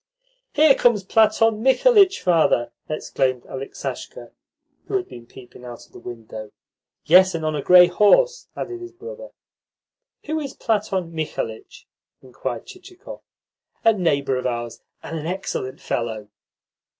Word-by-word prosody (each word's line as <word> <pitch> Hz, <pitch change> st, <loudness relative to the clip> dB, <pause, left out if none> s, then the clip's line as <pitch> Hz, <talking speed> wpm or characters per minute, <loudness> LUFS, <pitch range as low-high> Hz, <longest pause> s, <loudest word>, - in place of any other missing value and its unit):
"Here 300 Hz, -1 st, +6 dB
comes 235 Hz, -6 st, +2 dB
Platon 220 Hz, +2 st, +3 dB
Mikhalitch, 390 Hz, -, +4 dB
father!" 160 Hz, -9 st, +2 dB, 0.2 s
exclaimed 130 Hz, -4 st, -1 dB
Aleksasha, 135 Hz, +1 st, -7 dB, 0.6 s
who -, -, -3 dB
had 375 Hz, -2 st, -1 dB
been 120 Hz, -1 st, -12 dB
peeping 125 Hz, -1 st, -15 dB
out 120 Hz, -1 st, -10 dB
of -, -, -29 dB
the -, -, -13 dB
window. 110 Hz, -3 st, -9 dB, 0.5 s
"Yes, 185 Hz, +2 st, +6 dB
and 160 Hz, -1 st, -3 dB
on 155 Hz, -1 st, -1 dB
a 145 Hz, -, -2 dB
grey 180 Hz, +4 st, +8 dB
horse," 210 Hz, -, +3 dB
added 360 Hz, -1 st, -5 dB
his 355 Hz, 0 st, -9 dB
brother. 485 Hz, +6 st, -10 dB, 1.0 s
"Who 315 Hz, +1 st, -2 dB
is 280 Hz, -3 st, -6 dB
Platon 195 Hz, -6 st, -2 dB
Mikhalitch?" 150 Hz, -8 st, -5 dB, 0.3 s
inquired 120 Hz, -2 st, -6 dB
Chichikov. 370 Hz, +1 st, -12 dB, 0.6 s
"A 225 Hz, -, +6 dB
neighbour 140 Hz, -9 st, 0 dB
of 125 Hz, -, -2 dB
ours, 120 Hz, -1 st, -5 dB, 0.2 s
and 165 Hz, -, -5 dB
an 155 Hz, -, -6 dB
excellent 175 Hz, -8 st, -4 dB
fellow." 110 Hz, -3 st, -4 dB
180 Hz, 135 wpm, -22 LUFS, -, 1.0 s, grey